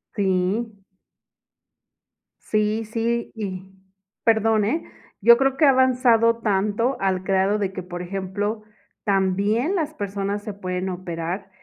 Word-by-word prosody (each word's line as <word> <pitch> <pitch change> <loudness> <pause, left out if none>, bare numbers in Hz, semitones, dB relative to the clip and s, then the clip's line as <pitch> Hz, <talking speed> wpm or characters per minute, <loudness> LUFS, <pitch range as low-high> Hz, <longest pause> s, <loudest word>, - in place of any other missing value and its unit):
Sí. 200 +2 -1 1.6
Sí, 215 +1 0
sí 230 +2 -2
y 190 -4 -5 0.6
perdón, 220 -1 +3
eh, 315 +11 -1 0.4
yo 235 +3 +8
creo 270 0 +2
que 305 - +5
ha - - +7
avanzado 250 -3 +4
tanto 215 +4 0
al 190 -1 0
grado 195 +2 +1
de 195 -2 -1
que, 185 -1 -6
por 175 0 -7
ejemplo, 195 +4 -3 0.4
también 200 - +1
las 310 -4 -1
personas 200 -1 -3
se 210 - -5
pueden 185 -1 -3
operar, 180 +1 -5
205 Hz, 125 wpm, -23 LUFS, 190-230 Hz, 1.6 s, yo